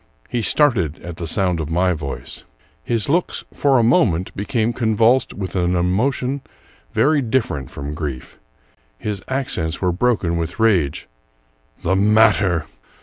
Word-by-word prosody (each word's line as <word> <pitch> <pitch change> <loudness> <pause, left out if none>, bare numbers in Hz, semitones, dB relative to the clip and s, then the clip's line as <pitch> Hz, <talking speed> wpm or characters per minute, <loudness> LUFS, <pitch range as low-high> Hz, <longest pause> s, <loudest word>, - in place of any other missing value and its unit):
He 120 - -1
started 105 - +2
at 85 -1 -7
the 85 - -4
sound 90 0 +2
of 80 -2 -4
my 90 +2 +2
voice. 75 -4 -6 0.4
His 115 -3 0
looks, 170 +5 0
for 140 -2 +3
a 120 - +3
moment, 95 -7 +2
became 115 +2 -1
convulsed 115 +2 +2
with 95 -3 -5
an 90 -1 +1
emotion 125 +10 0 0.5
very 150 0 +3
different 110 - -1
from 70 +1 -6
grief. 75 -5 -6 0.6
His 105 - -4
accents 110 -12 -2
were 90 -2 +1
broken 90 -4 0
with 85 +5 -4
rage: 95 -11 +1 0.4
— - - -35
"The 95 - +1
matter! 100 -5 +3
95 Hz, 145 wpm, -20 LUFS, 85-120 Hz, 0.6 s, for